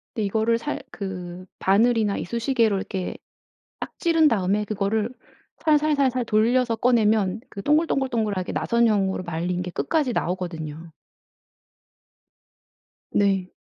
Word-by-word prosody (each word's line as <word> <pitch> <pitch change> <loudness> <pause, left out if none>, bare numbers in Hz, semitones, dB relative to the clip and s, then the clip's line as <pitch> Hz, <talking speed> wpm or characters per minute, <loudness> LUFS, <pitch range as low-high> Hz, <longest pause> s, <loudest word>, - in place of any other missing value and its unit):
근데 220 -4 -1
이거를 220 +3 +1
살 290 +4 -4
그 185 -2 -6
바늘이나 215 +1 +3
이쑤시개로 230 +1 0
이렇게 190 -1 -4 0.6
딱 - - -7
찌른 330 -5 +4
다음에 205 -2 +1
그거를 210 +2 -1 0.6
살살살살 290 -5 +2
돌려서 230 +2 +2
꺼내면 220 -4 +2
그 200 - -7
동글동글동글하게 255 - 0
나선형으로 210 -5 +1
말린 175 +1 -2
게 180 0 -5
끝까지 290 - 0
나오거든요. 165 -3 -4 2.2
네. 195 -2 +2
215 Hz, 280 characters per minute, -24 LUFS, 190-245 Hz, 2.2 s, 찌른